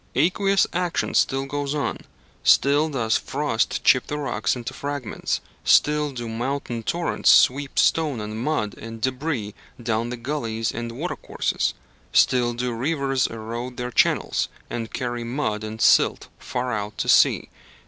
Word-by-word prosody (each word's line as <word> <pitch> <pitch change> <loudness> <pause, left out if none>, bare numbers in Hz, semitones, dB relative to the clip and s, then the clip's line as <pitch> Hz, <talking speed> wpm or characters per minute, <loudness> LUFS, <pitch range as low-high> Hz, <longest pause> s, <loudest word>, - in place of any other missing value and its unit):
Aqueous 195 - +3
action 175 -1 -1
still 135 0 +2
goes 145 +1 -3
on: 145 - -2 0.4
still 145 +3 +4
does 115 -6 +1
frost 135 -5 -1
chip 130 - +4
the 150 - -3
rocks 140 -3 -1
into 120 -2 -6
fragments; 140 -6 -3 0.2
still 150 0 +3
do 120 -3 -6
mountain 120 +1 -3
torrents 170 +9 0
sweep 140 +2 +4
stone 150 -7 +2
and 105 +1 -5
mud 120 -6 -1
and 115 0 -8
débris 130 -3 -2 0.3
down 115 0 -1
the 125 - -4
gulleys 115 -4 -2
and 120 0 -5
watercourses; 155 +10 -2 0.4
still 120 -2 +3
do 125 0 -2
rivers 135 +1 0
erode 115 +3 -6
their 125 0 -4
channels, - - +2 0.2
and 115 -2 -4
carry 120 -1 -3
mud 115 -4 -2
and 110 +1 -3
silt - - +4
far 125 -1 -3
out 105 -1 -4
to - - -2
sea. - - +4
125 Hz, 145 wpm, -23 LUFS, 115-145 Hz, 0.4 s, still